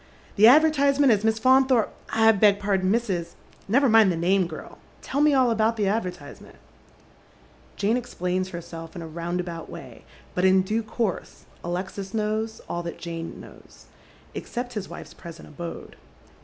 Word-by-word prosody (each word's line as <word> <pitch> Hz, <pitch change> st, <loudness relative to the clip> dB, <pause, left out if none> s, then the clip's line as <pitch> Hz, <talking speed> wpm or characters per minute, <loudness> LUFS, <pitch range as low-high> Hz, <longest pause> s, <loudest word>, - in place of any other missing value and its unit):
" -, -, -27 dB
" -, -, -26 dB
The 215 Hz, +2 st, +7 dB
advertisement 285 Hz, -1 st, +5 dB
as 210 Hz, -2 st, +2 dB
Miss 220 Hz, 0 st, +1 dB
Faunthoi 260 Hz, -1 st, +4 dB
pe -, -, -8 dB, 0.2 s
— -, -, -24 dB, 0.2 s
I -, -, +9 dB
beg 205 Hz, -1 st, +4 dB
pardon, 195 Hz, -2 st, 0 dB
Mrs. 235 Hz, 0 st, 0 dB
It 170 Hz, -2 st, -3 dB, 0.2 s
" -, -, -30 dB
Never 270 Hz, +7 st, +3 dB
mind 220 Hz, -4 st, +5 dB
the -, -, -1 dB
name, 180 Hz, +1 st, +1 dB
g^l. 155 Hz, -, -10 dB, 0.3 s
Tell 280 Hz, -, -1 dB
me 300 Hz, -1 st, +4 dB
all 255 Hz, -3 st, +3 dB
about 225 Hz, +1 st, +1 dB
the 205 Hz, -2 st, +1 dB
advertise 180 Hz, -8 st, -3 dB
ment." -, -, -15 dB, 1.2 s
Jane 220 Hz, +4 st, +1 dB
explains 185 Hz, -6 st, -3 dB
herself 165 Hz, -2 st, -9 dB
in 170 Hz, -, -6 dB
a -, -, -7 dB
roundabout 170 Hz, +1 st, -5 dB
way, -, -, -11 dB, 0.3 s
but 180 Hz, -, -1 dB
in 190 Hz, 0 st, +5 dB
due 215 Hz, +4 st, -1 dB
course 220 Hz, -2 st, -4 dB, 0.2 s
Alexis 190 Hz, +3 st, -5 dB
knows 220 Hz, +1 st, -2 dB
all 175 Hz, -, -3 dB
that 170 Hz, -1 st, -6 dB
Jane 165 Hz, -1 st, -7 dB
knows, -, -, -15 dB, 0.5 s
except 245 Hz, 0 st, -5 dB
his 210 Hz, -4 st, -5 dB
wife's -, -, -10 dB
present 170 Hz, -2 st, -11 dB
abode. 170 Hz, +3 st, -8 dB
200 Hz, 180 wpm, -25 LUFS, 175-230 Hz, 1.2 s, I